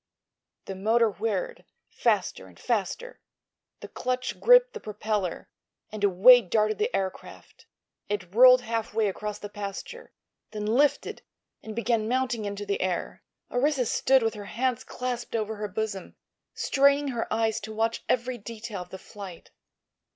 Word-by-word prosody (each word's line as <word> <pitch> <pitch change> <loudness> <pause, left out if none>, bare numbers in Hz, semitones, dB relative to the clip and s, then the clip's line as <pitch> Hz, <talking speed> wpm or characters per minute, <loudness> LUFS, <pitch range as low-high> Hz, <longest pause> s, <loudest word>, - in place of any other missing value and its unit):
The 195 - -5
motor 220 +4 +2
whirred—faster 200 0 -2
and - - -18
faster—the - - -6
clutch 255 0 -3
gripped - - +6
the - - -6
propeller, 210 -3 -3 0.4
and 215 -1 -6
away 205 +6 +7
darted 215 +2 0
the 435 - +1
aircraft. 190 -1 -6 0.4
It 190 -3 -4
rolled 250 +2 +8
half 225 -2 -3
way 220 -2 +2
across 210 +1 -4
the 205 - -7
pasture, 200 -1 -7 0.4
then 210 -1 -4
lifted 265 +7 +1 0.4
and 220 -1 -8
began 230 -2 0
mounting 245 -3 0
into 205 0 -4
the 200 0 -2
air. 180 -2 -2 0.3
Orissa 265 +1 +1
stood 265 +3 +3
with 225 - 0
her 205 -1 -8
hands 250 +3 -1
clasped 245 -2 -4
over 220 -1 -2
her 210 0 -3
bosom, 205 -2 -4 0.4
straining 280 +1 +3
her 235 -3 -3
eyes 225 -1 +1
to 220 +1 -8
watch 225 +1 -1
every 250 0 0
detail 220 -2 -7
of 180 - -10
the 190 - -8
flight. 190 -3 -11
220 Hz, 145 wpm, -27 LUFS, 205-245 Hz, 0.4 s, rolled